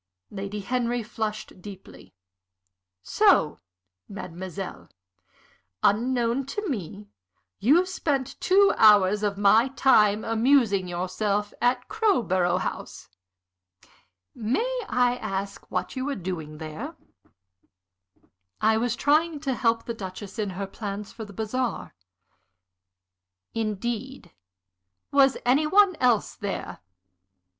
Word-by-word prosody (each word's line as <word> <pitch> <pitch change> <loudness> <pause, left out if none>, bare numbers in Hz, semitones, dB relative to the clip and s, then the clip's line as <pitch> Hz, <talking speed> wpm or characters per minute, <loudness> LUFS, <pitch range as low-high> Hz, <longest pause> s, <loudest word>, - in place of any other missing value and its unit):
Lady 200 +1 -5
Henry 240 +2 -1
flushed 215 -3 -5
deeply. 195 -1 -12 0.9
"So, - - +3 0.5
mademoiselle, 190 -1 -7 0.9
unknown 240 +4 +1
to 415 +9 -4
me, 190 - -5 0.5
you 305 - +4
spent 290 -8 -2
two 395 +2 +5
hours 210 -2 +6
of 205 -2 -1
my 215 +4 +5
time 215 -6 +3
amusing 225 -4 +2
yourself 200 +4 -2
at 245 +1 +1
Crowborough 190 - +1
House. - - -6 1.2
May 455 - -1
I 245 0 +2
ask 195 -3 -5
what - - -3
you 260 0 -3
were 285 -1 -2
doing 165 -5 -6
there?" 165 - -7 1.6
"I 220 +1 +3
was 240 +1 0
trying 305 +4 +2
to 275 -3 -1
help 230 -2 0
the 235 - -3
Duchess 195 +1 -8
in 210 -2 -1
her 200 - -2
plans 200 +1 -6
for 220 - -8
the 205 - -12
bazaar." 230 +4 -3 1.6
"Indeed? 225 0 -4 0.8
Was 275 -1 +4
any 275 +5 +3
one 395 +2 +5
else 245 -4 +2
there? 190 - -5
220 Hz, 105 wpm, -26 LUFS, 200-260 Hz, 1.6 s, hours